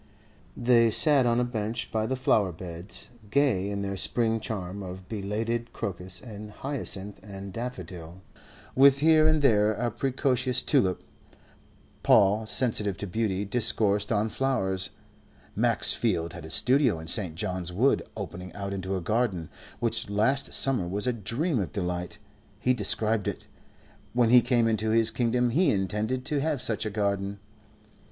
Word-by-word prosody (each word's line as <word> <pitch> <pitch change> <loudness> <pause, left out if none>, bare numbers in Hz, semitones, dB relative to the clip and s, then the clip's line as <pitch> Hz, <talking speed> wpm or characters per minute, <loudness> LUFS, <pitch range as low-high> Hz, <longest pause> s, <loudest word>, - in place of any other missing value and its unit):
They 120 -1 +4
sat 140 +2 +4
on 120 0 +2
a - - +2
bench 115 -1 -3
by 110 0 -1
the 130 - -1
flower 105 -7 +1
beds, 85 +2 -8 0.2
gay 110 -7 +1
in 100 0 -3
their 100 0 -4
spring 115 +2 +2
charm 100 -3 -5
of 90 0 -8
belated 115 +3 -3
crocus 90 -1 -3
and 105 -3 -9
hyacinth 105 -5 -4
and 100 -2 -9
daffodil, 90 -7 -7 0.5
with 135 +1 +6
here 155 +1 +4
and 155 -2 +2
there 105 -4 +4
a 120 +2 -2
precocious 125 0 0
tulip. 120 -11 +1 1.0
Paul, 105 +3 +4
sensitive 105 -5 +1
to 100 - -4
beauty, 100 0 -2
discoursed 105 -2 +2
on 110 0 +1
flowers. 95 -9 -1 0.7
Max - - +2
Field 85 -7 -1
had 85 -3 -9
a - - -9
studio 120 - +3
in 80 - -9
St. 85 -1 +2
John's 90 0 -3
Wood 120 +10 +2 0.2
opening 90 +1 -7
out 100 -1 -5
into 95 0 -3
a - - -5
garden, 100 -4 -1 0.3
which 115 -3 0
last 110 +7 0
summer 130 -10 +2
was 100 +3 -2
a 125 - +1
dream 120 - -1
of 95 - -3
delight. 90 -2 -4 0.4
He 125 - +2
described 110 -3 +2
it. - - -4 0.7
When 120 -1 +2
he 125 0 +8
came 120 -1 +2
into 110 -1 0
his 115 0 +4
kingdom 120 +1 0
he 165 +5 +3
intended 105 +4 -1
to 145 -2 -1
have 150 -2 -1
such 110 -2 -2
a - - -2
garden. 100 -1 -2
110 Hz, 155 wpm, -27 LUFS, 95-125 Hz, 1.0 s, he